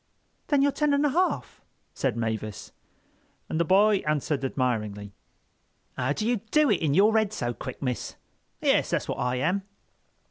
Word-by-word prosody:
"Then 285 -3 +3
you're 285 - +3
ten 295 0 +1
and 285 +1 +2
a - - +3
half," 365 +6 -1 0.3
said 125 -4 -1
Mavis. 110 -3 -4 0.8
And 160 - -2
the - - +4
boy 200 +4 +4
answered 150 -4 -1
admiringly: 105 -6 -2 0.8
"How 130 +2 0
do 215 +7 -2
you 240 0 +2
do 300 -4 +4
it 195 - +1
in 150 -3 +1
your 210 +4 +5
head 220 -2 +2
so 120 - -3
quick, 130 +2 -7
miss? 125 -4 -3 0.5
Yes, - - +2
that's - - -1
what - - -3
I 125 0 0
am." 180 +10 0
150 Hz, 170 wpm, -26 LUFS, -, 0.8 s, your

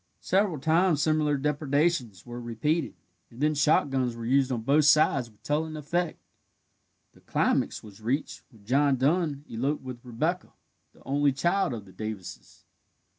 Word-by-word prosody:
Several 190 -3 +1
times 160 +2 +2
similar 155 -1 +2
depredations 145 - 0
were 120 0 -7
repeated, 135 +7 -1 0.3
and 120 - -15
then 150 +2 +2
shotguns 135 -4 +2
were 115 -1 -6
used 135 +2 +2
on 115 -3 -2
both 145 +4 +3
sides 145 -4 +4
with 105 - -27
telling 155 +2 -1
effect. 170 +3 -2 0.9
The - - -21
climax - - 0
was 105 0 -13
reached 130 +7 -2
when 110 -6 -21
John 140 +4 +3
Dun 145 +1 0
eloped 135 +6 -2
with 125 -2 -8
Rebecca, 155 +9 -2 0.4
the - - -21
only 140 +1 +2
child 175 +4 +1
of 105 -3 -8
the 95 - -16
Davises. 110 -2 -8
140 Hz, 150 wpm, -27 LUFS, 120-155 Hz, 0.9 s, sides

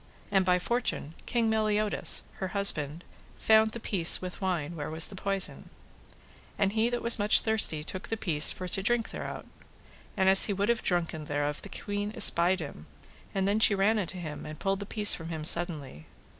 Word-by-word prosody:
And 195 -1 +3
by 180 -1 +2
fortune 180 - -2
King 235 -2 0
Meliodas, 215 -1 0
her 190 - -4
husband, 160 -5 -1 0.3
found 220 0 +4
the 235 - -8
piece 180 -6 +4
with 185 +1 -8
wine 175 -4 -2
where 145 -2 -5
was 160 +1 -1
the 200 - -10
poison, 195 -1 -1 0.9
and 200 0 0
he 225 +2 +1
that 240 0 -4
was 235 -1 +4
much 205 +1 +3
thirsty 215 -9 +2
took 185 +4 -7
the 225 - -3
piece 155 -8 +2
for 185 - -6
to 195 - -2
drink 230 +3 0
thereout. - - -7 0.7
And 190 -1 +2
as 190 0 +7
he 205 - -1
would 200 +3 -1
have 235 0 +1
drunken 170 -3 -2
thereof 145 0 -3
the - - -10
queen 205 0 -4
espied 175 +2 +4
him, 110 - -9 0.5
and 195 0 0
then 205 +2 +1
she 220 -2 +5
ran 210 +3 +2
unto 185 -1 -4
him, 155 -4 -7
and 155 0 -9
pulled 195 +3 -2
the 200 - -7
piece 210 -1 +4
from 165 -1 -6
him 160 -2 -6
suddenly. 155 - -1
190 Hz, 195 wpm, -28 LUFS, 165-210 Hz, 0.9 s, as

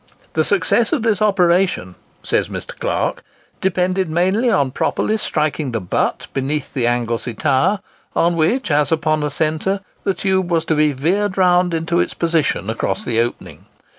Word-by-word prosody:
"The 160 - +2
success 200 +6 +2
of 275 -8 0
this 220 -4 +1
operation," 180 - +2 0.3
says - - 0
Mr. - - -7
Clark, - - -1 0.4
"depended 185 -1 0
mainly 190 +9 +2
on 140 - +2
properly 215 - 0
striking 155 - -1
the 115 - 0
'butt' 90 - -1
beneath 140 +2 -2
the 120 -3 0
Anglesey 120 -1 -1
tower, 150 - +1 0.3
on 170 +1 +2
which, 170 +6 +1
as 145 0 +2
upon 155 -1 +1
a 150 - -1
centre, 160 +6 -1 0.2
the 195 - 0
tube 190 -2 0
was 165 -2 +1
to 160 - +1
be 150 0 +3
veered 185 +9 0
round 180 -2 +3
into 165 +1 0
its - - -1
position 165 - 0
across 110 +1 -2
the 115 -2 0
opening. 120 +1 -4
165 Hz, 165 wpm, -19 LUFS, 145-190 Hz, 0.4 s, be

